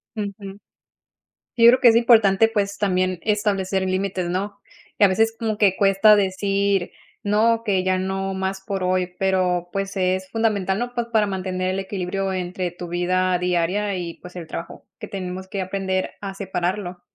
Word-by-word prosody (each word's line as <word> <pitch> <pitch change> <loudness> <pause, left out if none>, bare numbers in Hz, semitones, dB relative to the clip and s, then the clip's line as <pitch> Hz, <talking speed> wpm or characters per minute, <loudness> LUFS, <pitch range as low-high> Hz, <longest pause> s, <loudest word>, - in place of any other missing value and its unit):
Ujú, 200 -2 -6 1.0
yo 230 0 +7
creo 250 +2 +7
que 255 - +5
es 225 - +4
importante, 225 -3 +5
pues, 200 -2 -1
también 185 -2 0
establecer 200 -2 0
límites, 185 -1 -1
¿no? 200 +3 -3 0.4
Y - - +3
a - - +8
veces, 225 +4 +1
como 220 -2 -2
que 200 -3 +3
cuesta 200 +2 +5
decir: 195 -1 0 0.3
"No, 225 +3 +2
que 195 -4 +1
ya 185 0 +1
no 190 +1 -2
más 190 0 -3
por 190 -1 -4
hoy", 180 0 0
pero, 185 -2 0
pues, 195 0 -3
es 185 0 0
fundamental, 205 -4 0
¿no?, 245 0 -3
pues, 240 -1 -2
para 215 -2 +3
mantener 185 -1 -2
el 190 - -2
equilibrio 195 0 -3
entre 180 -1 -3
tu 175 0 -8
vida 180 +1 +1
diaria 180 +3 0
y, 175 -2 -5
pues, 180 0 -13
el 170 -3 -7
trabajo, 165 - -8
que - - -7
tenemos 185 -1 -6
que 195 0 -4
aprender 190 0 -2
a 195 -1 -5
separarlo, 185 -1 -3
190 Hz, 170 wpm, -22 LUFS, 185-205 Hz, 1.0 s, a